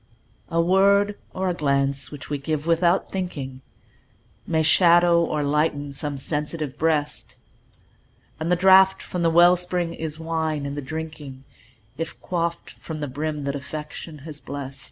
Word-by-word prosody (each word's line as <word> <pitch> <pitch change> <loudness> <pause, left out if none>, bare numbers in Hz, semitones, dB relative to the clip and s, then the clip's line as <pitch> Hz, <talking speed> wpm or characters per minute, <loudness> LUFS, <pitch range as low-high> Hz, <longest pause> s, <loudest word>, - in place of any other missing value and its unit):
A 165 - 0
word 200 +4 +4 0.2
or 190 0 -2
a 180 - +1
glance 140 -3 0
which 145 -3 -9
we 145 -1 -3
give 155 +1 -2
"without 170 +2 +2
thinking", 140 -9 -5 0.9
May 160 -2 +1
shadow 170 +1 +5
or 150 -2 -1
lighten 145 -1 0
some 145 +1 -4
sensitive 150 0 -4
breast; 155 -2 -1 1.0
And 160 +2 -2
the - - +5
draught 190 +1 +6
from 180 - -4
the 165 - +3
well 175 +2 +6
spring 175 -1 -2
is 160 -2 -5
wine 160 -2 -2
in 140 - -4
the 145 - -4
drinking, 150 -2 -7 0.6
If 165 - -5
quaffed 170 -1 -3
from 160 -2 -6
the 145 - -3
brim 150 +2 -3
that 140 0 -2
Affection 150 +3 -7
has 155 -3 -8
blest. 140 -2 -7
160 Hz, 155 wpm, -24 LUFS, 145-170 Hz, 1.0 s, draught